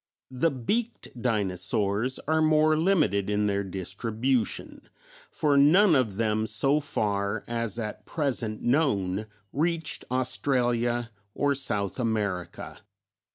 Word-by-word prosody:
The 130 +6 +2
Beaked 215 - -2
Dinosaurs 105 +1 0
are 160 +1 +2
more 155 0 +4
limited 155 - +2
in 105 0 +1
their 100 -1 0
distribution, 110 +6 -2 0.5
for 145 -2 +1
none 170 +7 +6
of 120 -7 +1
them 110 0 0
so 135 +7 +2
far 100 -6 -1
as 115 -2 -3
at 110 -3 -5
present 125 -8 -2
known 110 -7 +1 0.3
reached 165 +1 0
Australia 120 -2 0 0.2
or 145 0 +2
South 105 -6 -2
America. 105 -6 -3
120 Hz, 110 wpm, -27 LUFS, 105-145 Hz, 0.5 s, none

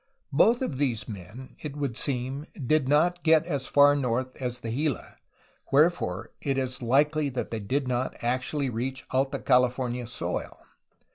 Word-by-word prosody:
Both 230 - +4
of 140 - -3
these 125 -6 0
men, 105 +5 -9
it 150 -2 -6
would 140 -5 -2
seem, 135 +3 -2
did 145 0 +1
not 175 +4 +3
get 160 0 +4
as 140 -6 -1
far 145 0 +6
north 130 -1 -1
as 125 -1 -3
the 115 - -4
Gila, 140 +1 -2 0.5
wherefore 140 - +2
it 135 -1 -1
is 130 -1 -2
likely 145 +5 +2
that 130 -2 -4
they 115 - -2
did 130 +7 -1
not 125 +1 -1
actually 130 +3 -1
reach 130 +4 -4
Alta 135 +1 +1
California 125 -1 +1
soil. 120 - -4
130 Hz, 155 wpm, -27 LUFS, 125-145 Hz, 0.5 s, far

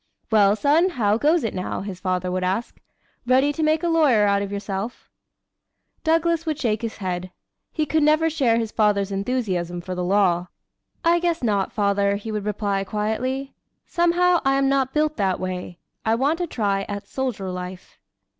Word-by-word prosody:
"Well, 205 -2 +5
son, 300 - +3
how 220 - +1
goes 310 +5 +3
it 225 - -2
now?" 185 - -3
his 195 -2 -6
father 185 -1 -1
would 185 0 -1
ask. 190 +6 -2 0.5
"Ready 265 +3 +3
to 320 - -4
make 310 +1 +2
a - - +1
lawyer 295 -11 +4
out 200 0 +2
of 200 0 -4
yourself?" 200 +3 -5 0.9
Douglas 330 +1 +2
would 310 -3 -2
shake 225 -7 -1
his 230 -1 -4
head. 185 -2 -3 0.4
He 310 - -1
could 315 +2 +1
never 305 +2 +4
share 270 -8 +2
his 225 -2 -2
father's 205 -2 +1
enthusiasm 195 -5 -2
for 185 +1 -6
the 180 0 -3
law. 180 -2 +2 0.6
"I 340 +1 +4
guess 340 -4 -1
not, 205 -4 +1
father," 200 -1 +1
he 210 +2 -5
would 210 -1 -3
reply 205 -2 -1
quietly. 230 +7 -2 0.3
"Somehow, 345 +1 +3
I 270 0 +2
am 275 0 +2
not 270 -1 +1
built 305 +1 0
that 190 -3 0
way. 180 -1 -5 0.3
I 220 0 +2
want 290 +8 0
a 350 - -1
try 200 -8 -1
at 205 -1 -5
soldier 235 -8 -3
life." 180 0 -8
220 Hz, 180 wpm, -23 LUFS, 195-290 Hz, 0.9 s, Well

